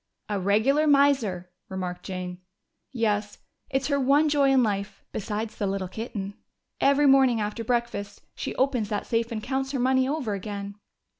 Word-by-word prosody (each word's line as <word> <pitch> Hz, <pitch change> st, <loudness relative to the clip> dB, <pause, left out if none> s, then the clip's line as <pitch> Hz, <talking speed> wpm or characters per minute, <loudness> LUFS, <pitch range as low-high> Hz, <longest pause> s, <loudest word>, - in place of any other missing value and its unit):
"A 205 Hz, -1 st, -1 dB
regular 220 Hz, +11 st, +3 dB
miser," 265 Hz, -11 st, +3 dB, 0.2 s
remarked 180 Hz, -1 st, -4 dB
Jane. 180 Hz, -1 st, -5 dB, 0.5 s
"Yes. 210 Hz, -4 st, -1 dB, 0.3 s
It's 270 Hz, 0 st, 0 dB
her 280 Hz, -1 st, +1 dB
one 285 Hz, +3 st, +4 dB
joy 285 Hz, -2 st, +3 dB
in 265 Hz, -2 st, +5 dB
life 200 Hz, -2 st, -2 dB
besides 215 Hz, +2 st, -4 dB
the 205 Hz, -, -1 dB
little 195 Hz, -1 st, -2 dB
kitten. 205 Hz, 0 st, -5 dB, 0.5 s
Every 280 Hz, +1 st, +4 dB
morning 265 Hz, -4 st, +5 dB
after 210 Hz, +2 st, -3 dB
breakfast 230 Hz, -4 st, -2 dB
she -, -, -5 dB
opens 250 Hz, -6 st, +1 dB
that 205 Hz, -1 st, -2 dB
safe 230 Hz, 0 st, 0 dB
and 215 Hz, -2 st, -4 dB
counts 265 Hz, +1 st, -2 dB
her 270 Hz, -, -1 dB
money 260 Hz, +1 st, +3 dB
over 280 Hz, -8 st, -1 dB
again." 200 Hz, 0 st, -5 dB
225 Hz, 160 wpm, -26 LUFS, 200-270 Hz, 0.5 s, in